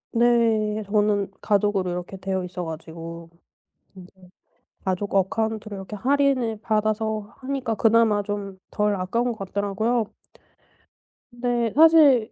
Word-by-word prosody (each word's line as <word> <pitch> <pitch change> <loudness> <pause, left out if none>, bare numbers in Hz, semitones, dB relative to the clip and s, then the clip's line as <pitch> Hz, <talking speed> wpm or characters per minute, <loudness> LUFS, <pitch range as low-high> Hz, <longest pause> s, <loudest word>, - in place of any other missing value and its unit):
네. 225 -3 +2
저는 205 -1 +1
가족으로 205 -3 +1
이렇게 180 +2 -5
되어있어 185 -2 -3
가지고 165 +1 -8 0.6
근데 185 -2 -13 0.8
가족 190 +2 -2
어카운트로 215 +2 -1
이렇게 195 +2 -7
할인을 255 -2 +1
받아서 215 0 -1
하니까 260 -4 -2
그나마 220 -2 +3
좀 200 -1 -5
덜 210 0 +1
아까운 230 +6 -1
것 - - -13
같더라고요. 205 +4 -1 1.3
근데 240 -1 -1
사실 295 -7 +6
210 Hz, 275 characters per minute, -24 LUFS, 195-230 Hz, 1.3 s, 사실